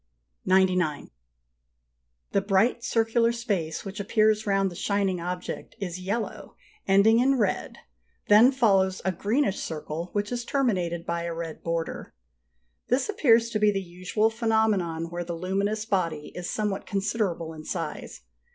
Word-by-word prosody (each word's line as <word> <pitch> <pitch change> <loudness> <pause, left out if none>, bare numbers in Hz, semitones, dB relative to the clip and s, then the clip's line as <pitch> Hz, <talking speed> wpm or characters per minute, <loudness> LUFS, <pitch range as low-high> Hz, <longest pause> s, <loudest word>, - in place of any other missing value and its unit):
Note 190 +1 +6
G. 185 -1 -1
99. 155 -5 -2 1.2
The 200 - +2
bright 200 +5 +2
circular 230 +1 +2
space 200 -10 -3
which 195 +2 -6
appears 215 +1 +2
round 195 -1 +2
the - - -10
shining 195 -1 0
object 180 +1 -5
is 185 -2 -5
yellow, 205 +5 -4 0.3
ending 200 +4 +5
in 270 +2 +3
red: 220 - -1 0.5
then 220 +5 +7
follows 195 -7 +2
a 190 - +2
greenish 205 +3 0
circle, 160 +2 -5
which 205 +1 -1
is 240 -1 -2
terminated 185 -11 -1
by 170 0 -2
a 170 -1 -3
red 165 -1 -6
border. 165 - -4 0.7
This 255 - +1
appears 235 - +3
to 215 - 0
be 210 0 +4
the 200 -1 0
usual 185 +4 -1
phenomenon 215 -8 0
where 175 0 -3
the 170 0 -5
luminous 200 +4 -1
body 170 -8 -1
is 180 -1 -5
somewhat 210 -2 -2
considerable 195 -5 -1
in 155 -1 -10
size. 165 - -5
195 Hz, 150 wpm, -26 LUFS, 175-220 Hz, 1.2 s, then